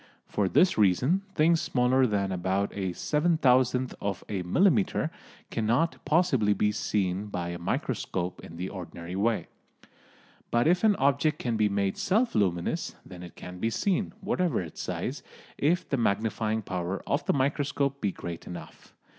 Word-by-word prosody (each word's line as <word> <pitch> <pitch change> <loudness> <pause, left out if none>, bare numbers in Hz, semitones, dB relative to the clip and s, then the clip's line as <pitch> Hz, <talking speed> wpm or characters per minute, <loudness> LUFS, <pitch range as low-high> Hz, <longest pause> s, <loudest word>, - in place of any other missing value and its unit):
For 100 -2 0
this 180 - +4
reason 125 - +3
things 165 +2 +4
smaller 125 +1 +3
than 100 -3 0
about 95 +2 -1
a 95 -2 -1
seven 155 - +1
thousandth 130 -2 +3
of 100 -2 -3
a 100 -3 -2
millimetre 180 - +2 0.4
cannot 120 +9 0
possibly 150 - +3
be 105 +1 +1
seen 100 -2 -1
by 90 -4 -3
a 85 0 -5
microscope 90 +1 -2
in 85 - -10
the 90 +2 -3
ordinary 90 -2 -7
way. 110 +3 +1 1.0
But 120 +2 +2
if 175 +4 +3
an 215 -2 +5
object 140 +2 +2
can 120 -2 -2
be 105 -1 +2
made 100 -1 0
self 225 +6 +2
luminous, 95 - 0
then 90 -2 -10
it 90 -2 -10
can 90 0 -9
be 115 - +1
seen, 195 - 0
whatever 180 -9 0
its 80 -4 -6
size, - - -3 0.4
if 165 +5 +2
the 140 - 0
magnifying 110 0 0
power 90 0 -3
of 145 - 0
the - - +3
microscope 140 0 0
be 100 - +1
great 85 -2 -7
enough. 90 - -10
110 Hz, 160 wpm, -28 LUFS, 95-145 Hz, 1.0 s, an